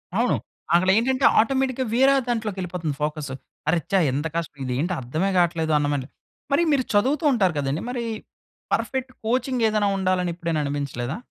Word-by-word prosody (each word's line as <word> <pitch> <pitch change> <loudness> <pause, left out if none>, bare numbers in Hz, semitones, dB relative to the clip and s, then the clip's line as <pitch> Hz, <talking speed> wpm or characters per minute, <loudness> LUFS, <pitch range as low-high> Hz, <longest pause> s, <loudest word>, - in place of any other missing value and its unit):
అవును. - - +2 0.4
అక్కలేంటంటే 225 +9 +3
ఆటోమేటిక్‌గా 260 +2 +1
వేరే 270 +2 +5
దాంట్లోకెళ్ళిపోతంది 185 - -2
ఫోకస్. 150 -2 -3 0.4
అరె, 170 +2 +3
ఛా! 195 - +4
ఎంత 145 +4 -1
కష్టం 160 -4 -4
ఇదేంటో 135 +9 -1
అర్థమే 155 +11 -1
గాట్లేదు 165 -2 +2
అన్నమరి. 145 -3 -1 0.4
మరి 280 +5 +4
మీరు 270 -3 +3
చదువుతూ 265 +10 +2
ఉంటారు 190 -7 +2
కదండీ, 140 +3 -1
మరీ 245 -1 -3 0.7
పర్‌ఫెక్ట్ 260 -1 -1
కోచింగేదైనా 225 -3 +1
ఉండాలని 185 -2 +1
ఎప్పుడైనా 165 -3 -1
అనిపించలేదా? 140 -1 -3
185 Hz, 135 wpm, -24 LUFS, 150-240 Hz, 0.7 s, వేరే